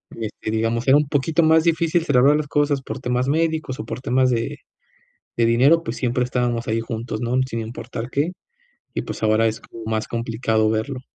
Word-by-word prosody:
este, 110 Hz, -1 st, -5 dB
digamos, 115 Hz, +3 st, -1 dB
era 135 Hz, -, +7 dB
un 150 Hz, -1 st, +1 dB
poquito 155 Hz, +4 st, +1 dB
más 160 Hz, 0 st, +5 dB
difícil, 165 Hz, 0 st, +2 dB
celebrar 140 Hz, 0 st, +4 dB
las 150 Hz, -1 st, -1 dB
cosas 145 Hz, -1 st, +1 dB
por -, -, -6 dB
temas 125 Hz, +1 st, -1 dB
médicos, 160 Hz, -2 st, 0 dB
o 110 Hz, -, -5 dB
por 120 Hz, -, -6 dB
temas 130 Hz, 0 st, +2 dB
de 115 Hz, -2 st, -2 dB, 0.8 s
de 115 Hz, -, +3 dB
dinero, 135 Hz, +9 st, +4 dB
pues, 115 Hz, -, -4 dB
siempre 125 Hz, 0 st, 0 dB
estábamos 120 Hz, -1 st, -1 dB
ahí 110 Hz, +1 st, +1 dB
juntos, 115 Hz, 0 st, -4 dB
¿no?, 120 Hz, +1 st, -1 dB
sin 115 Hz, -3 st, -4 dB
importar 115 Hz, +1 st, -6 dB
qué. 145 Hz, +7 st, 0 dB, 0.6 s
Y, -, -, -2 dB
pues, -, -, -7 dB
ahora, 110 Hz, +1 st, +3 dB
es 110 Hz, 0 st, -2 dB
como 115 Hz, -, -11 dB
más 110 Hz, 0 st, -2 dB
complicado 115 Hz, -2 st, 0 dB
verlo. 125 Hz, +4 st, -2 dB
125 Hz, 195 wpm, -22 LUFS, 115-145 Hz, 0.8 s, era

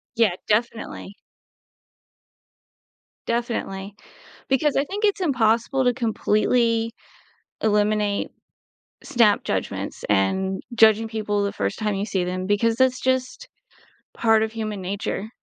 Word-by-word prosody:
Yeah, 220 Hz, -6 st, +3 dB
definitely. 215 Hz, -2 st, -2 dB, 2.1 s
Definitely, 215 Hz, -4 st, -3 dB, 0.6 s
because 280 Hz, +2 st, +2 dB
I 275 Hz, -, +3 dB
think 410 Hz, +5 st, -2 dB
it's 405 Hz, -2 st, +1 dB
impossible 245 Hz, -2 st, +2 dB
to 245 Hz, -, +3 dB
completely 230 Hz, 0 st, +1 dB, 0.7 s
eliminate 210 Hz, -1 st, +1 dB, 0.8 s
snap 230 Hz, -6 st, +3 dB
judgments, -, -, -3 dB
and 190 Hz, -, +1 dB
judging 220 Hz, 0 st, +5 dB
people 210 Hz, -2 st, -1 dB
the 200 Hz, -, -1 dB
first 100 Hz, 0 st, -3 dB
time 210 Hz, -2 st, -1 dB
you 200 Hz, +2 st, -2 dB
see 190 Hz, -3 st, -1 dB
them, 185 Hz, +1 st, -3 dB
because 215 Hz, +3 st, +2 dB
that's 255 Hz, +1 st, +2 dB
just 260 Hz, -, -1 dB, 0.7 s
part 225 Hz, -1 st, +3 dB
of 220 Hz, -, -5 dB
human 215 Hz, -3 st, -4 dB
nature, 195 Hz, +2 st, -4 dB
220 Hz, 115 wpm, -23 LUFS, 205-240 Hz, 2.1 s, judging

